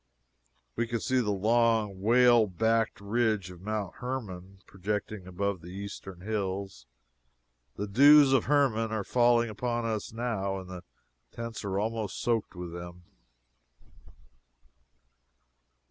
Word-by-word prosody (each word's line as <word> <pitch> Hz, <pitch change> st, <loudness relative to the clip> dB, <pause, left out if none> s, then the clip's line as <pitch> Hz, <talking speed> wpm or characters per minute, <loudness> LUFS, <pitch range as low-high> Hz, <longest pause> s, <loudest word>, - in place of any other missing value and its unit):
We 120 Hz, -, -1 dB
can 115 Hz, 0 st, -2 dB
see 130 Hz, +3 st, +1 dB
the 115 Hz, -4 st, 0 dB
long, 110 Hz, -1 st, +1 dB
whale 120 Hz, +1 st, +5 dB
backed 115 Hz, +4 st, 0 dB
ridge 105 Hz, -2 st, 0 dB
of 90 Hz, -1 st, -13 dB
Mount 105 Hz, -2 st, -4 dB
Hermon 100 Hz, -7 st, -6 dB
projecting 100 Hz, 0 st, -4 dB
above 95 Hz, 0 st, -2 dB
the 85 Hz, -, -12 dB
eastern 95 Hz, -1 st, -8 dB
hills. 95 Hz, -, -4 dB, 0.9 s
The 105 Hz, -, -3 dB
"dews 140 Hz, +6 st, +7 dB
of 130 Hz, -, +3 dB
Hermon" 125 Hz, -6 st, +2 dB
are 110 Hz, -2 st, -2 dB
falling 120 Hz, 0 st, +3 dB
upon 120 Hz, +1 st, -2 dB
us 110 Hz, -2 st, -3 dB
now, 110 Hz, -4 st, -2 dB
and 95 Hz, -1 st, -8 dB
the 90 Hz, -1 st, -8 dB, 0.5 s
tents 115 Hz, -1 st, -6 dB
are 95 Hz, -1 st, -2 dB
almost 110 Hz, 0 st, -2 dB
soaked 115 Hz, -5 st, -1 dB
with 90 Hz, -1 st, -7 dB
them. 85 Hz, 0 st, -9 dB
105 Hz, 125 wpm, -29 LUFS, 95-115 Hz, 0.9 s, dews